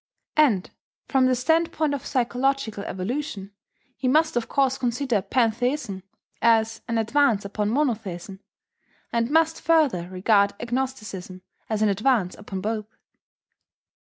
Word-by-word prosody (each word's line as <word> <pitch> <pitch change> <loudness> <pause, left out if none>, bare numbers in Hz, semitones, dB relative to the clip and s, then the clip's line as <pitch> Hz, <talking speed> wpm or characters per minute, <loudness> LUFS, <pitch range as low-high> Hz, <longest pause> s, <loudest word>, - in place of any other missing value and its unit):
And, 245 -12 +3 0.4
from 265 -2 +3
the 255 - +3
standpoint 320 +2 +1
of 280 -1 -4
psychological 250 -3 0
evolution, 200 0 -4 0.4
he 260 - -2
must 315 +3 +3
of 240 -1 -1
course 270 -1 +1
consider 245 -3 0
pantheism 235 0 0 0.4
as 225 -1 +3
an 230 - -1
advance 225 -2 +2
upon 205 +1 -2
monotheism, 210 - -2 0.7
and 230 0 +1
must 320 +1 +2
further 285 - +2
regard 200 +2 +2
agnosticism 230 -7 -4 0.3
as 215 -1 0
an 215 - +4
advance 205 -2 +1
upon 195 -2 -6
both. 215 +1 -3
230 Hz, 120 wpm, -24 LUFS, 205-270 Hz, 0.7 s, an